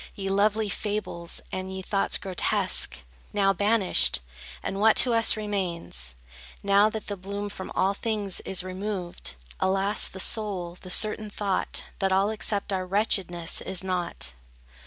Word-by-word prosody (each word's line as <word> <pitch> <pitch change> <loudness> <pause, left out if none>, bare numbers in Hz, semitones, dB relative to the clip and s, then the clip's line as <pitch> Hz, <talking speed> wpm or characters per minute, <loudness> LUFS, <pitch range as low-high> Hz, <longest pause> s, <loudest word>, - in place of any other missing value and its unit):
Ye 195 -1 -3
lovely 210 +2 +2
fables, 200 -5 -3
and 185 0 -4
ye 190 0 -5
thoughts 195 +1 +1
grotesque, 170 - 0 0.3
Now 195 -1 +3
banished! 205 0 +2 0.4
And 195 - -3
what 220 0 +6
to 245 - +6
us 230 -1 +5
remains? 170 - -1 0.5
Now 200 +1 +5
that 220 0 -5
the 205 - -3
bloom 200 +2 -5
from 190 -2 -7
all 195 +1 +3
things 205 -3 -2
is 190 -1 0
removed? 185 - -4 0.2
Alas, 195 +2 +1
the 190 - -9
sole, 190 -5 -1
the 185 - -9
certain 215 +2 +4
thought, 200 -2 -1 0.2
That 195 -1 +1
all 195 +3 +3
except 205 -2 -1
our 185 -1 -1
wretchedness, 180 -4 0
is 190 -1 -2
nought. 175 - -2
195 Hz, 145 wpm, -27 LUFS, 185-210 Hz, 0.5 s, what